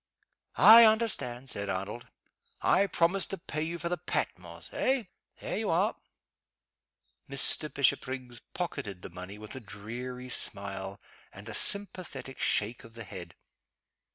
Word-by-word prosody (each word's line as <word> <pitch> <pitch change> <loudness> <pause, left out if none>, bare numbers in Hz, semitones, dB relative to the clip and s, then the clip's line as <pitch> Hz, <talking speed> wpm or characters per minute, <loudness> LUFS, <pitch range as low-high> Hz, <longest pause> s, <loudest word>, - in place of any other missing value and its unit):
"I 230 +2 +10
understand!" 215 - +2
said 100 0 -4
Arnold. 100 +6 -4 0.5
"I 200 - +3
promised 175 +1 +1
to 195 - -4
pay 155 -4 -5
you 165 +2 -3
for 170 - -4
the 175 +1 -2
Patmos - - -4
eh? 260 -2 +1 0.4
There - - -3
you - - -2
are!" - - +2 1.3
Mr. 140 +2 +2
Bishopriggs 130 -3 0
pocketed 135 - -4
the - - -8
money 90 +3 -8
with 105 0 -8
a 130 - -6
dreary 125 +3 -7
smile 100 -4 0 0.3
and 100 +2 -11
a 115 - -6
sympathetic 180 - 0
shake 115 +5 0
of 115 -1 -15
the 115 - -7
head. 90 -3 -9
125 Hz, 135 wpm, -30 LUFS, 105-170 Hz, 1.3 s, I